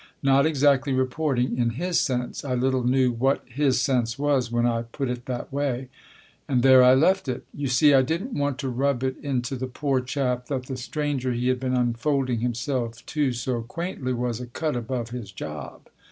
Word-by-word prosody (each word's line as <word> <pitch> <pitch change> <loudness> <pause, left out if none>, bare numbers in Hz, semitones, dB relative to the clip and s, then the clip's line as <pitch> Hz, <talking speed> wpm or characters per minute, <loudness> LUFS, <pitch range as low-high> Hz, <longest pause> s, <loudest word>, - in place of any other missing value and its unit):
Not 140 +2 +4
exactly 140 -2 +3
reporting, 130 -1 0
in 120 -1 +2
his 180 0 +1
sense 125 -2 -2
(I 130 -3 -1
little 130 0 +1
knew 130 0 +3
what 130 +4 +1
his 130 +1 +1
sense 125 -3 0
was 140 -4 +1
when 120 0 +1
I 115 -1 +1
put 125 +3 -4
it 120 -1 -6
that 125 0 -5
way); 135 -3 -2 0.6
and 125 -3 +1
there 130 -1 +8
I 125 +1 +7
left 185 +5 +3
it. 125 -2 -3
You 145 -1 -3
see, 135 +4 +5
I 135 - +6
didn't 170 - -2
want 145 -2 -1
to 135 - -2
rub 130 +1 0
it 130 0 0
into 135 -2 -2
the 130 0 -4
poor 135 +1 -1
chap 125 -1 -2
that 130 -3 -3
the 130 - -5
stranger 130 0 -2
he 120 +1 0
had 130 -1 +1
been 130 0 -1
unfolding 125 +1 0
himself 120 0 -2
to 145 -4 0
so 120 0 -2
quaintly 140 +1 -4
was 120 -1 -2
a 125 - -6
cut 150 +4 -2
above 120 0 -3
his 120 -5 -6
job. 75 -6 -7
130 Hz, 195 wpm, -25 LUFS, 120-140 Hz, 0.6 s, there